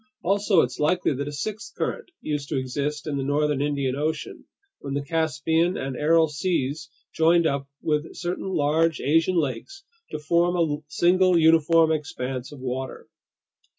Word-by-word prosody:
Also 195 -1 +3
it's - - -3
likely 165 +2 +1
that 140 +2 -4
a - - -4
sixth 215 +9 -5
current 470 - -3
used 150 -2 -3
to 145 - -1
exist 140 +3 -3
in 150 -3 -2
the 135 - -2
northern 145 0 0
Indian 140 -3 -1
Ocean, 155 +3 -3 0.3
when 140 -1 -5
the 140 - -1
Caspian 160 +2 0
and 135 -1 -4
Aral 160 +3 +3
Seas 150 -2 -2 0.2
joined 165 +1 +4
up 140 -2 -1
with 150 0 -1
certain 175 +2 -4
large 160 -1 +1
Asian 165 +5 +2
lakes 175 - -3 0.3
to - - -4
form 170 +3 +1
a 160 -4 +1
single 180 +3 +3
uniform 160 0 +5
expanse 130 -4 -4
of 145 - -11
water. 130 +1 -5
155 Hz, 155 wpm, -24 LUFS, 140-170 Hz, 0.3 s, uniform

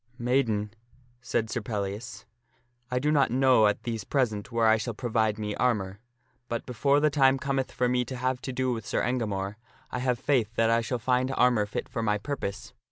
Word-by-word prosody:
" 125 - -34
Maiden," 120 -4 0 0.5
said 120 -2 -1
Sir 120 - -2
Pellias, 105 +3 -5 0.3
" 120 0 -43
I 125 - -1
do 150 +4 +1
not 145 -2 +3
know 130 -3 +4
at 105 - -1
these 115 -3 -3
present 115 -4 -1
where 115 -1 +2
I 110 0 +5
shall 115 0 -4
provide 110 -3 0
me 105 -1 -3
armor; 100 -5 0 0.5
but 115 - -3
before 140 +4 +2
the 150 0 +3
time 135 -2 +4
cometh 135 -1 -2
for 125 - 0
me 125 0 +1
to 130 - -6
have 130 0 -1
to 130 - -4
do 130 0 0
with 115 -2 -5
Sir - - 0
Engamore, 105 -5 -2 0.3
I 125 - -3
have 125 -1 0
faith 120 -4 0
that 115 0 +3
I 115 0 +3
shall 125 +2 -2
find 125 +2 +1
armor 120 -4 +3
fit 105 - -4
for 120 -2 -4
my 105 -2 +1
purpose. 110 -2 -5
120 Hz, 210 wpm, -27 LUFS, 110-130 Hz, 0.5 s, I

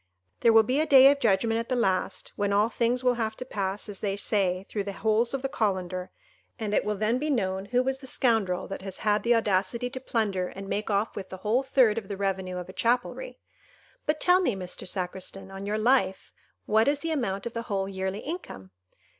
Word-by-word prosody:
There 230 - +5
will 225 0 +7
be 255 +6 0
a 315 - +1
day 270 0 +8
of 285 - -1
judgment 225 0 +2
at 230 - -5
the 255 - +1
last, 195 -5 -1
when 205 0 0
all 205 +3 +3
things 240 +2 0
will 250 -1 +4
have 220 -1 -1
to 255 - -7
pass, 200 -4 -3
as 205 -2 -7
they 200 -1 -2
say, 195 -3 0
through 205 -2 -3
the 200 - -4
holes 220 +3 +1
of 275 -1 -3
the - - +1
colander, 185 -6 -2 0.5
and 215 -3 -3
it - - +3
will 210 0 -1
then 220 +4 +1
be 305 +2 -2
known 190 -7 0
who 245 +4 +1
was 265 +1 -1
the 265 - -11
scoundrel 225 -9 +1
that 195 - -6
has 190 -1 -5
had 210 0 +3
the 235 0 +3
audacity 220 +3 0
to 260 - -5
plunder 210 -7 -1
and 195 +1 -8
make 210 +2 -2
off 205 +1 0
with 190 -1 -6
the 190 - -7
whole 230 +5 +3
third 255 -5 +3
of 205 - -14
the 200 -1 -5
revenue 190 -2 -2
of 180 - -6
a 185 - -10
chapelry! 245 - -1 0.7
But 300 0 +1
tell 360 +3 +4
me, 250 - +1
Mr. 185 -1 -6
Sacristan, 190 +1 -4
on 195 +1 -7
your 210 +1 0
life, 215 -4 +1 0.3
what 220 +3 +3
is 285 0 +2
the 330 - -2
amount 200 -10 -2
of 235 - -4
the 230 - -3
whole 195 -1 -1
yearly 190 +1 -3
income?" 285 - -7
215 Hz, 230 wpm, -27 LUFS, 195-245 Hz, 0.7 s, day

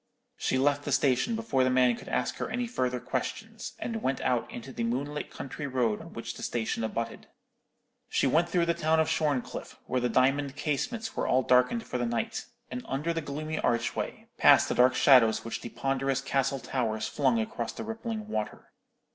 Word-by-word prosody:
She - - 0
left 145 +2 +2
the 145 - -3
station 140 - +2
before 185 -13 +1
the 130 - +3
man 125 -1 +4
could - - -10
ask 125 - -1
her - - -3
any 245 0 -1
further 125 - -1
questions, 225 - -4
and 225 -2 -4
went 135 +1 0
out 125 -2 0
into 125 +2 -8
the 115 - -3
moonlit 140 +6 -2
country 140 +2 -6
road 125 -5 0
on - - -11
which - - -5
the - - -10
station 115 -1 -2
abutted. 115 +1 -3 0.8
She - - +2
went 170 +2 +3
through 170 0 +2
the 170 - +2
town 160 0 +2
of 160 - +3
Shorncliffe, 150 -5 -1
where 130 - 0
the 125 - +1
diamond 135 +3 +2
casements 215 - -2
were - - -1
all 130 +1 +3
darkened 125 - +3
for 125 - -3
the 120 - 0
night, 115 0 -2 0.2
and 125 0 -4
under 150 +5 -1
the 165 - -2
gloomy 155 +2 -4
archway, 120 0 -1
past - - +7
the - - +1
dark 125 +1 +5
shadows 120 -6 +5
which 115 - -4
the 120 - -6
ponderous 135 0 0
castle 135 0 0
towers 115 -3 -1
flung 130 -5 +2
across 115 +1 -3
the - - -6
rippling 225 -1 -4
water. 110 - -4
135 Hz, 195 wpm, -29 LUFS, 125-155 Hz, 0.8 s, past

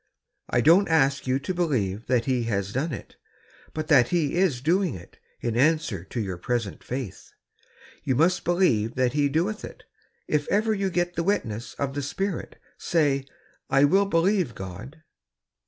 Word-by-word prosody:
" - - -53
I 120 - +2
don't 170 - +5
ask 140 -5 +2
you 130 +1 +2
to 140 +7 -3
believe 120 - -1
tliat 125 -2 +2
He 125 -3 0
has 100 -2 -2
done 150 +6 -1
it, - - -8 0.5
but 155 0 -4
that 130 -6 +6
He 165 -5 0
is 175 -8 +2
doing 170 - +1
it, 85 - -13 0.2
in 115 -2 -2
answer 140 - +1
to 120 - -5
your 95 -5 -3
present 115 -1 -2
Fiith. 125 -6 -6 0.8
Y''ou 130 - +2
must 170 +5 +3
believe 165 - +2
that 125 -1 +2
Fie 145 +1 +1
doeth 180 +9 -1
it, - - -10 0.4
if 150 -1 0
ever 215 +2 +2
you 195 -2 -1
get 175 -1 -1
the 170 - -1
witness 120 - -2
of 140 -1 -2
the 145 - -2
Spirit. 190 +6 -4 0.2
Say, 145 -5 +1 0.2
' - - -37
I - - +6
will 195 +7 +4
believe 175 - +1
God. 105 - -9
145 Hz, 175 wpm, -25 LUFS, 120-175 Hz, 0.8 s, that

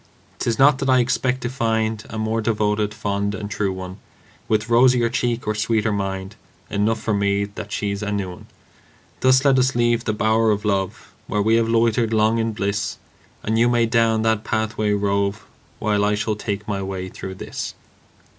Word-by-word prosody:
'Tis 115 -2 0
not 135 0 +5
that 135 - -1
I 130 - +5
expect 125 +1 +1
to 120 - -2
find 110 -3 -1
A 110 - -6
more 110 +1 -1
devoted, 105 -1 0
fond 100 -1 -2
and 105 -1 -6
true 100 -1 -1
one, 95 0 -7 0.5
With 110 0 +1
rosier 120 0 +4
cheek 120 -1 -1
or 105 - 0
sweeter 110 +1 0
mind 95 0 -3 0.4
Enough 105 +2 +1
for 110 0 -1
me 100 0 +1
that 100 0 -9
she's 100 -1 -2
a 105 -1 -2
new 100 -3 -2
one. 90 - -12 0.7
Thus 130 +1 +4
let 135 -2 +5
us 130 0 +2
leave 120 0 +2
the 110 - +1
bower 110 +1 +2
of 105 0 0
love, 95 -2 -2
Where 105 -1 0
we 110 +2 +3
have 115 -1 +1
loitered 115 0 +2
long 110 +1 +3
in 115 0 0
bliss; 100 +1 -2 0.5
And 110 +1 0
you 120 +1 +4
may 120 -1 +3
down 115 -1 +2
that 110 -1 +1
pathway 110 -1 -1
rove, 100 0 0 0.3
While 105 -1 +1
I 105 0 +2
shall 105 +1 -1
take 105 -1 -4
my 100 -2 -2
way 95 -1 -4
through 95 0 -7
this. - - -6
110 Hz, 190 wpm, -22 LUFS, 100-115 Hz, 0.7 s, not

